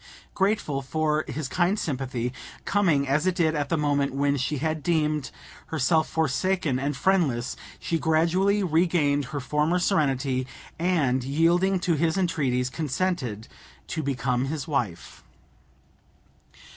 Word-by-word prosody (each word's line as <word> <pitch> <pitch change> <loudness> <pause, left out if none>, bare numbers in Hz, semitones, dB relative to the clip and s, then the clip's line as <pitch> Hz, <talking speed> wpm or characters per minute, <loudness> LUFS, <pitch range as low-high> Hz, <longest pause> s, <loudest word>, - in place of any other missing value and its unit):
Grateful 190 -8 0
for 155 +2 0
his 155 -2 -4
kind 180 +7 +1
sympathy, 130 - -3 0.3
coming 170 -9 +2
as 150 +6 +1
it 185 - +1
did 160 -3 +2
at 145 -2 -2
a 165 - +2
moment 145 -2 0
when 140 0 +2
she 140 +2 -1
had 155 +2 -2
deemed 150 -3 0 0.4
herself 160 +1 +1
forsaken 160 -1 0
and 140 +1 -2
friendless, 140 -9 +1 0.2
she 165 -2 -2
gradually 175 +6 +2
regained 160 -4 +2
her 145 +3 -5
former 150 +5 +1
serenity, 135 -8 +1 0.3
and, 150 -8 +1
yielding 170 +7 +2
to 180 - +1
his 160 +3 +1
entreaties, 135 -9 0
consented 140 - -2 0.4
to 160 - -3
become 130 -2 -1
his 150 +2 -4
wife. 120 - -3
150 Hz, 130 wpm, -26 LUFS, 135-170 Hz, 0.4 s, coming